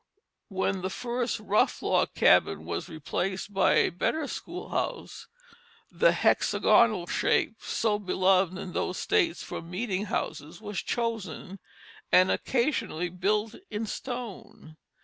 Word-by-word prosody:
When 190 -1 -1
the 185 - -2
first 240 +3 -2
rough 215 +4 +1
log - - +1
cabin - - +4
was - - -4
replaced 185 +5 -3
by 195 - +4
a - - +4
better 290 - -1
schoolhouse - - -5 0.6
the - - +4
hexagonal 215 -7 +3
shape, 220 - +1
so 210 -2 0
beloved 185 -1 +2
in 190 -2 -7
those 185 - -2
states 380 -6 +1
for - - -6
meeting 185 +3 -3
houses, 160 -4 -4
was 210 -2 -4
chosen, 205 -5 -3 0.5
and 185 +1 +6
occasionally 235 - 0
built 210 +5 0 0.2
in 215 +1 -3
stone. 230 -9 -7
200 Hz, 120 wpm, -28 LUFS, 185-230 Hz, 0.6 s, and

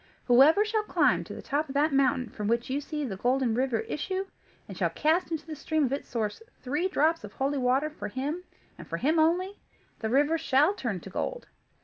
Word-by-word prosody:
Whoever 285 - +6
shall 435 0 0
climb 425 - +2
to - - -8
the - - -9
top 295 +1 -1
of 270 - -7
that 295 +1 +2
mountain 265 -3 +2
from 210 0 -5
which 235 +3 0
you 280 +2 0
see 300 0 -4
the 195 -7 -5
Golden 250 +2 +1
River 245 -1 0
issue, 375 +5 -3 0.4
and - - -8
shall - - +1
cast 325 +4 +1
into 320 -2 -4
the 315 -1 -6
stream 305 +1 0
at 255 - -2
its 275 - -4
source 220 - -2 0.2
three 295 +8 -1
drops 325 -2 +1
of 205 - -9
holy 275 +1 -1
water, 265 +4 +1
for 310 - -6
him, 285 - -3 0.4
and - - -10
for - - -3
him 315 +4 +2
only, 360 +5 +1 0.4
the 220 - -2
river 290 +6 +3
shall 300 +4 +3
turn 230 - -3
to 195 - -10
gold. - - -3
285 Hz, 220 wpm, -28 LUFS, 255-320 Hz, 0.4 s, Whoever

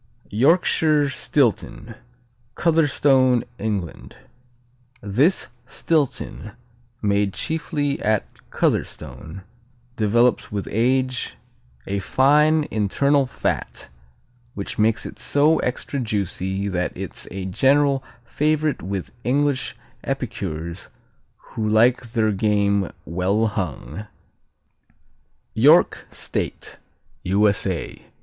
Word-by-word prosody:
Yorkshire 150 - +3
Stilton 120 -4 0 0.6
Cotherstone, 140 -6 +3 0.2
England 100 -6 -4 0.8
This 130 - +1 0.2
Stilton, 140 -8 -1 0.5
made 100 -1 +1
chiefly 145 -3 -2
at 110 -1 +1 0.2
Cotherstone, 90 +4 -2 0.5
develops 115 +3 +2
with 100 -1 -3
age 130 +2 0 0.5
a 100 +1 -2
fine 150 - +3
internal 135 +7 +2
fat 125 - -3 0.7
which 100 +1 -5
makes 110 +1 +2
it - - -8
so 150 +3 +3
extra 130 +2 -2
juicy 100 -3 -2
that 90 -2 -1
it's - - -5
a 95 +1 -5
general 135 +7 +2 0.2
favorite 150 +3 0
with 95 -1 -4
English 140 +2 0 0.3
epicures 85 +3 -4 0.6
who 110 -1 -2
like 120 +2 +3
their 110 -2 +2
game 100 -1 +1 0.2
well 95 +6 0
hung. 105 0 -4 1.5
York - - +4
State - - -5 0.4
_U.S.A. 100 -2 0
115 Hz, 85 wpm, -22 LUFS, 100-140 Hz, 1.5 s, York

